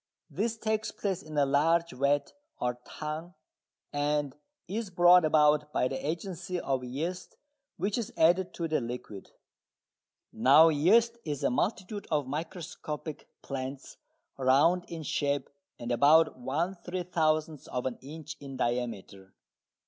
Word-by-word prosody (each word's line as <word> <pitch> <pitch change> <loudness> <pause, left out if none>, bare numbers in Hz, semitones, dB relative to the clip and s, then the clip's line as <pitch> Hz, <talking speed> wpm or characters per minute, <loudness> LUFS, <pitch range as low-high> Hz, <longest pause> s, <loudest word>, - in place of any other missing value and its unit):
This 225 +2 -1
takes 220 0 -1
place 195 -4 -3
in 155 -1 -8
a 145 - +4
large 165 +5 +2
vat 140 +2 0 0.3
or 125 0 -2
"tun" 155 +4 -6 0.6
and 145 -1 0 0.3
is 210 +3 -3
brought 175 0 +6
about 150 -1 +3
by 125 - +1
the 135 - -4
agency 175 +2 -3
of 135 -4 -1
yeast 160 +9 -5 0.4
which 205 +4 -1
is 225 - -4
added 175 +3 +4
to 170 - -2
the 155 -3 0
liquid. 115 -4 -7 1.0
Now 140 +8 +7
yeast 225 +10 +3
is 145 -3 -4
a - - +2
multitude 195 - -2
of 150 -3 +1
microscopic 155 +1 -6 0.2
plants 135 0 -6 0.4
round 145 +8 +4
in 165 -2 -6
shape 140 -2 -1 0.3
and 120 0 -5
about 150 +6 +5
one 160 +9 -2
three 180 0 -3
thousandth 155 -3 0
of 125 - -3
an 130 -2 -3
inch 155 +2 -8
in 135 -2 -8
diameter. 115 -6 -3
155 Hz, 135 wpm, -29 LUFS, 135-175 Hz, 1.0 s, Now